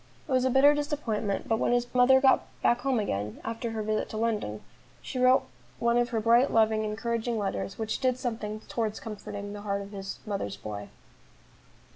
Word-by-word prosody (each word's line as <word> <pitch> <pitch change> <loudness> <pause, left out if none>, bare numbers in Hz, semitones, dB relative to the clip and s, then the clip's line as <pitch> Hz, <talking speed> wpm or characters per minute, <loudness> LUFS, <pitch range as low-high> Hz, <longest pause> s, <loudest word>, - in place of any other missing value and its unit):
It - - -7
was 255 0 +3
a - - +3
bitter 270 +3 +6
disappointment; 280 -9 -2
but 225 0 +1
when - - +2
his 245 0 +2
mother 255 +1 +6
got 265 0 +4 0.2
back 240 +1 +3
home 265 -1 +1
again 105 - -3
after 230 +1 -3
her 220 -1 -3
visit 215 0 -1
to 215 - -5
London, 215 - -1 0.4
she 255 - -5
wrote 255 +1 +5 0.3
one 235 0 +2
of 240 0 +2
her 230 -2 0
bright, 235 +5 +4
loving, 220 -1 +3
encouraging 230 +2 -2
letters, 100 - -3
which 220 -1 -2
did 255 -2 +1
something 220 -4 -4
towards 220 -2 -3
comforting 205 -2 -7
the 205 - -7
heart 200 -1 -2
of 200 - -11
this 195 -1 -6
"mother's 195 - -3
boy." 105 0 -7
225 Hz, 190 wpm, -28 LUFS, 205-245 Hz, 0.4 s, bitter